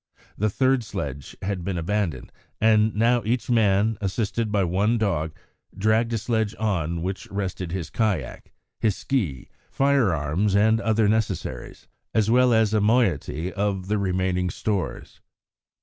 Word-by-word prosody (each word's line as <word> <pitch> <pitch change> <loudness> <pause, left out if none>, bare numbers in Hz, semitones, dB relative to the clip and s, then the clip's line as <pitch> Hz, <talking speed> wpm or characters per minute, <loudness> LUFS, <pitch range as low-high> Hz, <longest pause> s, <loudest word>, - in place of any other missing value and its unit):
The 105 +2 0
third 130 +3 +2
sledge 70 - -6
had 95 -2 -2
been 95 0 -2
abandoned, 85 -6 -2 0.3
and 110 -1 +3
now 120 +3 +3
each 120 +3 -1
man, 110 -1 +2
assisted 105 +2 -1
by 100 -2 +2
one 100 +6 +1
dog, 80 -8 0 0.5
dragged 110 +3 +2
a - - +1
sledge 110 -1 -1
on 85 -6 -1
which 95 +1 -4
rested 95 -3 -4
his 85 -4 -4
kayak, 95 - -2 0.3
his 105 -3 +1
ski, 90 - -2 0.2
firearms, 100 - +1
and 110 +2 +3
other 110 -1 +2
necessaries, 110 0 -2 0.3
as 110 0 +3
well 125 +1 +5
as 110 -2 +3
a 110 - +3
moiety 95 - +1
of 100 -2 -2
the 105 0 +1
remaining 90 -1 0
stores. 100 -1 -4
105 Hz, 140 wpm, -24 LUFS, 90-110 Hz, 0.5 s, well